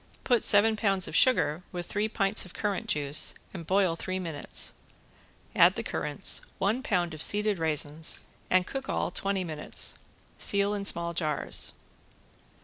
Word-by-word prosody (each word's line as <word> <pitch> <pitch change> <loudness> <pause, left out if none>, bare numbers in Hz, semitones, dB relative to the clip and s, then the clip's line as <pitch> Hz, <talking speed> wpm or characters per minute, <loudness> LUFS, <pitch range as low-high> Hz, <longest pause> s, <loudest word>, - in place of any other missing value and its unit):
Put 245 -3 +2
seven 220 +1 +6
pounds 195 -3 +1
of - - -6
sugar 170 - +3
with 175 -1 -5
three 210 +2 -2
pints 200 -1 +1
of 185 - -11
currant 210 +2 -3
juice 145 -4 +2 0.2
and 170 -4 -8
boil 185 -2 +2
three 185 +3 -4
minutes, 165 -5 -3 0.8
add - - +5
the - - -4
currants, - - -1 0.2
one 210 +6 0
pound 180 - -1
of 155 - -8
seeded 210 -1 +3
raisins, 155 0 0 0.3
and 185 0 +3
cook 270 +4 -6
all - - -1
twenty 195 -2 -1
minutes. 155 -3 -2 0.4
Seal 200 0 +1
in 200 -1 -4
small 170 -3 -1
jars. 155 -3 -3
185 Hz, 150 wpm, -28 LUFS, 165-205 Hz, 0.8 s, seven